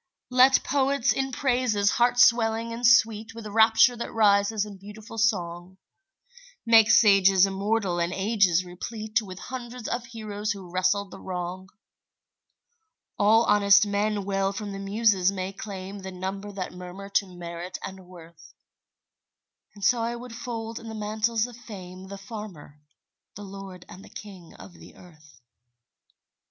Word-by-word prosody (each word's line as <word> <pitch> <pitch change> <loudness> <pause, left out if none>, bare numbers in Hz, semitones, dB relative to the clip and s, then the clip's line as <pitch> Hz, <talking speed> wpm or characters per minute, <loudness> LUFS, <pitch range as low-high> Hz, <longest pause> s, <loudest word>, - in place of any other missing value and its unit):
Let 255 +1 +5
poets 275 -1 +1
in 270 0 -2
praises 245 -6 +1
heart 245 0 +2
swelling 230 -1 +3
and 235 +1 +1
sweet 225 -2 +3
With 230 -1 -9
rapture 225 +3 +4
that 235 - -5
rises 205 -1 +2
in 205 -2 -10
beautiful 210 +3 -10
song, 180 -4 -1 0.9
Make 225 -2 +6
sages 195 -3 +6
immortal 195 -1 -1
and 170 0 0
ages 190 -3 +1
replete 215 +5 -3
With 185 -4 -10
hundreds 245 0 -7
of 240 0 -3
heroes 215 -2 -4
who 190 -3 -11
wrestled 185 +2 0
the - - -10
wrong; 185 +1 -6 1.5
All 220 +3 +5
honest 205 0 +5
men 205 0 -1
well 195 0 0
from 205 0 -6
the 195 - -6
Muses 195 -2 +2
may 190 0 -5
claim 195 0 -8
The 190 0 -8
numbers 195 +2 -6
that 185 -2 -5
murmur 180 +2 -9
to 200 0 +1
merit 170 +1 -7
and 190 -1 -9
worth, 170 -2 -15 1.2
And 200 -2 -5
so 240 +2 +3
I 235 +1 -2
would 240 0 -9
fold 230 -2 -6
in 230 - -10
the 220 - -7
mantles 215 +1 -1
of 245 -1 -10
fame 190 -6 -10
The 200 +1 -8
farmer, 195 -8 -10 0.6
the 205 - -9
lord 195 -2 -10
and 185 +2 -12
the - - -14
king 190 -5 -12
of 95 -1 -13
the 80 -1 -15
earth. 155 -7 -18
205 Hz, 150 wpm, -26 LUFS, 185-225 Hz, 1.5 s, Make